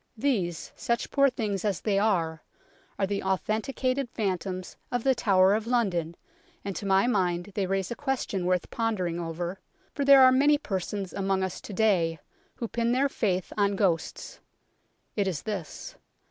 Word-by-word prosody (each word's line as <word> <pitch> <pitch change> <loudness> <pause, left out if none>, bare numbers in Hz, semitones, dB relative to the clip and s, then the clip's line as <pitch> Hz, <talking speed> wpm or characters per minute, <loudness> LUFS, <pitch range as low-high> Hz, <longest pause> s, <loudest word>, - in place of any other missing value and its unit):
These, 200 - -1
such 235 0 -2
poor 275 -1 +4
things 210 -6 -3
as 205 -3 0
they 200 -2 +1
are, 170 -7 +1 0.6
are 195 - +1
the 200 +1 -2
authenticated 245 +7 -1
phantoms 185 -4 -3 0.2
of 245 -2 -1
The 270 - +4
Tower 195 -5 +4
of 220 +1 -1
London, 185 -9 0 0.5
and 195 -2 -3
to 200 - -4
my 195 +1 +4
mind 185 -5 0
they 195 -2 -1
raise 195 +1 -1
a - - -2
question 250 -10 -2
worth 180 -1 0
pondering 190 -7 -1
over, 170 +2 -4 0.3
for 285 - -1
there 275 -1 +8
are 255 - +8
many 290 +3 +4
persons 195 - -4
among 195 -1 0
us 190 -1 -4
to - - -9
day 185 -6 +2 0.4
who 235 - -4
pin 235 +1 0
their 275 +2 +2
faith 190 -8 -1
on 200 -1 +2
ghosts. 180 -5 -1 0.8
It 205 -2 +1
is 175 -6 -3
this. 200 -7 -5
200 Hz, 165 wpm, -27 LUFS, 185-235 Hz, 0.8 s, there